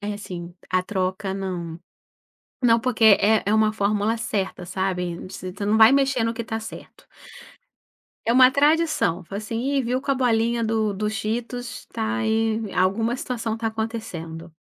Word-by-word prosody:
É 205 0 -3
assim, 175 -4 -8 0.2
a 185 0 +2
troca, 190 0 -2
não. 180 -4 -4 0.8
Não, 230 -1 +4
porque 235 -2 -1 0.2
é 215 +1 +3
é 205 - +2
uma 215 0 +3
fórmula 210 +2 0
certa, 195 -5 -3
sabe. 180 -1 -2
Você 185 -1 -7
tê 200 +2 -5
não 210 +2 +2
vai 220 +1 +8
mexer 270 -3 +2
no 230 - 0
que 230 - -4
está 225 0 -4
certo. 225 0 -11 1.2
É 230 - +3
uma 255 +1 +7
tradição. 290 - +2
Fo 195 - -10
assim, 215 +2 -4
Ih, 275 +1 0
viu 250 +2 -1
com 275 - -3
a - - +3
bolinha 235 -2 +1
do 220 -2 0
do 210 +2 -2
Cheetos, 240 +3 -4
tá 225 +1 -2
aí 220 -1 +1
vi 215 -4 -6
alguma 200 +6 +1
situação 240 -4 -3
está 225 0 -3
acontecendo. 200 -8 -5
220 Hz, 170 wpm, -23 LUFS, 195-235 Hz, 1.2 s, vai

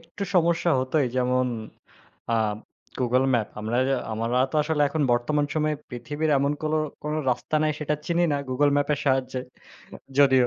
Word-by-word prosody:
একটু 170 +4 -9
সমস্যা 170 0 +3
হতই 130 +2 +1
যেমন 125 0 +2 0.9
আ - - +3 0.6
গুগল 125 +1 +2
ম্যাপ। 110 -3 +1
আমরা 110 +3 -1 0.3
আমার 115 +1 -2 0.2
তো - - 0
আসলে 150 -1 +1
এখন 155 +1 -1
বর্তমান 145 +5 +1
সময়ে 155 -1 +1 0.2
পৃথিবীর 145 +5 -2
এমন, 140 +1 +1
কোন, 155 0 0 0.3
কোন 150 - -3 0.2
রাস্তা 125 +5 -1
নাই 155 0 +2
সেটা 150 0 0
চিনি 170 0 +2
না 145 - +1
গুগল 145 +3 +3
ম্যাপের 145 0 +1
সাহায্যে 130 -2 +1 0.8
যদিও। 130 -3 +5
145 Hz, 155 wpm, -25 LUFS, 125-155 Hz, 0.9 s, যদিও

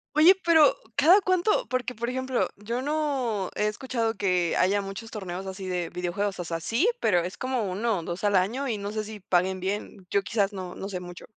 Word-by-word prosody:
Oye, 335 +5 +8
pero, 320 -3 +6 0.2
¿cada 350 +8 +6
cuánto? 370 +3 +2
Porque, 250 -1 -2
por 235 +2 -3
ejemplo, 260 0 0
yo 235 +5 -3
no 270 -10 -1
he 210 - +1
escuchado 225 +1 -1
que 180 -4 +1
haya 195 +3 +3
muchos 200 +3 -6
torneos 190 -2 -6
así 190 0 -6
de 180 -2 -2
videojuegos. 190 +3 -2
O 175 - -2
sea, 165 0 -3
sí, 235 - +1
pero 180 - +3
es 180 +2 -5
como 255 -3 -1
1, 205 +3 0
o, 165 - -7
2 175 +4 -5
al 205 -1 +3
año, 235 +10 +1
y 225 - -1
no 200 0 -4
sé 215 0 -2
si 215 0 -8
paguen 185 0 +1
bien. 195 0 -4
Yo 200 - +3
quizás 205 -1 0
no 185 -2 -6
no 195 - -5
sé 190 -3 -4
mucho. 175 0 -10
205 Hz, 215 wpm, -27 LUFS, 185-255 Hz, 0.2 s, Oye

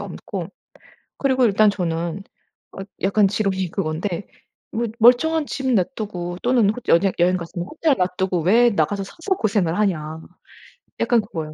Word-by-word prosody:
없고 - - -6 0.7
그리고 265 -2 +2
일단 210 0 +4
저는 170 -1 -3 0.5
어 - - -9 0.2
약간 200 +1 +3
지론이 190 -3 -1
그건데 170 +1 -3 0.5
뭐 235 +2 -1
'멀쩡한 295 +7 +4
집 265 -1 -3
놔두고 185 -5 -2
또는 240 -4 +3
호 215 - -4
연행 190 +3 +4
여행 180 +1 +3
갔으면 175 +1 -6
호텔 310 +3 +1
놔두고 180 -1 -1
왜 235 +7 +4
나가서 195 +2 0
사서 350 - -3
고생을 195 -5 0
하냐.' 160 -6 -1 0.8
약간 235 -2 +3
그거예요. 160 -7 -6
195 Hz, 300 characters per minute, -21 LUFS, 175-230 Hz, 0.8 s, 일단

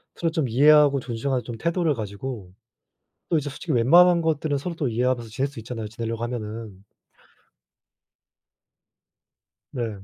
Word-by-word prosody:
서로 165 -1 -1
좀 160 -6 -1
이해하고 145 +2 +5
존중하는 125 +1 -2
좀 115 0 -7
태도를 170 +3 0
가지고 105 -3 -6 0.8
또 165 - +3
이제 145 -1 -2
솔직히 155 +2 -4
웬만한 170 +8 +5
것들은 155 -2 0
서로 170 +5 -4
또 145 -5 -1
이해하면서 120 0 -1
지낼 135 +5 -1
수 140 -4 -10
있잖아요, 110 -1 -6
지내려고 115 0 -4
하면은. 110 -4 -6 2.9
네. 115 -7 -5
125 Hz, 315 characters per minute, -24 LUFS, 115-150 Hz, 2.9 s, 이해하고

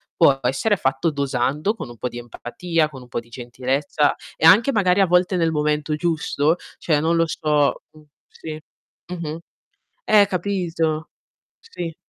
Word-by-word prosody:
Può 140 -5 +4
essere 135 - +1
fatto 135 +2 0
dosando, 140 - -1
con 135 - -7
un 120 - -12
po' 125 - -3
di 120 - -8
empatia, 155 +7 -2
con 135 -4 -11
un 125 - -14
po' - - -2
di 115 - -14
gentilezza 130 +5 -1 0.2
e - - +1
anche 210 +11 +7
magari 200 -5 +3
a - - +5
volte 180 +1 +2
nel 165 -2 +1
momento 150 0 0
giusto, 160 -1 0 0.2
cioè, 155 -3 +1
non 165 +2 +1
lo 165 0 +3
so, 150 -2 0
mh, 155 - -17 0.3
sì, 155 -1 -8 0.5
mh-mh. 165 -3 -5 0.6
Eh, 205 - +5
capito. 175 -4 -2 0.5
Sì, 175 - -7
155 Hz, 160 wpm, -22 LUFS, 140-175 Hz, 0.6 s, anche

